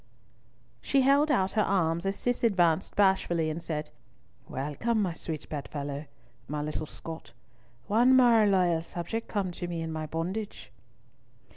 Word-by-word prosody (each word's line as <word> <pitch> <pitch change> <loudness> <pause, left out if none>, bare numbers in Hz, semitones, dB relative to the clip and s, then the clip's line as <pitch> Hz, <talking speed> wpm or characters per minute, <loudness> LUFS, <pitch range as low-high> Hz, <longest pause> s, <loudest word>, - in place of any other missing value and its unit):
She 275 - +2
held 280 +3 +4
out 190 -8 +2
her 215 - +2
arms 170 -3 +1
as 195 - -1
Cis 245 +4 -2
advanced 180 -5 +2
bashfully, 175 -5 +2
and 160 +2 -5
said: 150 -2 -4 0.6
"Welcome, 150 - -1
my 185 -5 0
sweet 160 -2 -6
bed 145 -2 -5
fellow, 145 0 -5 0.4
my 150 0 -3
little 155 +1 -4
Scot—one 150 - -2
more 235 -4 +6
loyal 180 -4 +3
subject 175 +7 -5
come 195 -4 -2
to 175 0 -5
me 170 -1 -4
in 160 - -4
my 155 -1 -4
bondage." 185 +7 -4
175 Hz, 145 wpm, -29 LUFS, 155-210 Hz, 0.6 s, more